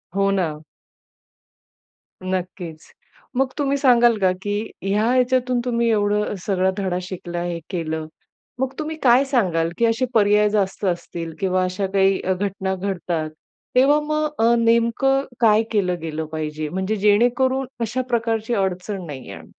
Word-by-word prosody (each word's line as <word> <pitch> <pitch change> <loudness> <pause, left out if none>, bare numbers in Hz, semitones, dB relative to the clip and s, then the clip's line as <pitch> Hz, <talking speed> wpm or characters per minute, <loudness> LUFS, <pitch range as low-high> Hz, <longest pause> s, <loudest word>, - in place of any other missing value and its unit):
हो 195 0 +2
ना. 165 -6 -1 1.6
नक्कीच. 180 -3 -5 0.5
मग 265 0 +1
तुम्ही 280 -1 +1
सांगाल 240 -4 +5
का, 190 -2 +3
की 205 +2 -3
ह्या 205 +3 +1
ह्याच्यातून 255 0 +2
तुम्ही 235 -1 +1
एवढं 210 -1 +1
सगळा 190 -1 +1
धडा 190 -3 -1
शिकला, 175 -1 -5
हे 175 -1 -3
केलं, 160 -3 -3 0.5
मग 265 0 -1
तुम्ही 310 +1 -3
काय 250 +1 +6
सांगाल, 185 - +1
की 235 - +3
असे 225 +3 +1
पर्याय 210 -1 +4
जास्त 205 -1 -1
असतील 170 -2 -3
किंवा 185 -1 +1
अशा 185 +2 -2
काही 195 0 +3 0.2
घटना 190 -1 -2
घडतात. 175 -4 -3 0.5
तेव्हा 275 +4 +5
मग 305 0 +1 0.2
अ, 235 +1 +5
नेमकं 235 +4 +2 0.2
काय 220 -1 +5
केलं 180 -5 0
गेलं 160 -1 -4
पाहिजे? 155 -1 -4
म्हणजे 190 +5 -2
जेणेकरून 245 +6 +2 0.2
अशा 230 +3 -1
प्रकारची 230 -1 0
अडचण 190 -1 -2
नाही 140 -5 -8
येणार? - - -9
205 Hz, 140 wpm, -22 LUFS, 180-235 Hz, 1.6 s, काय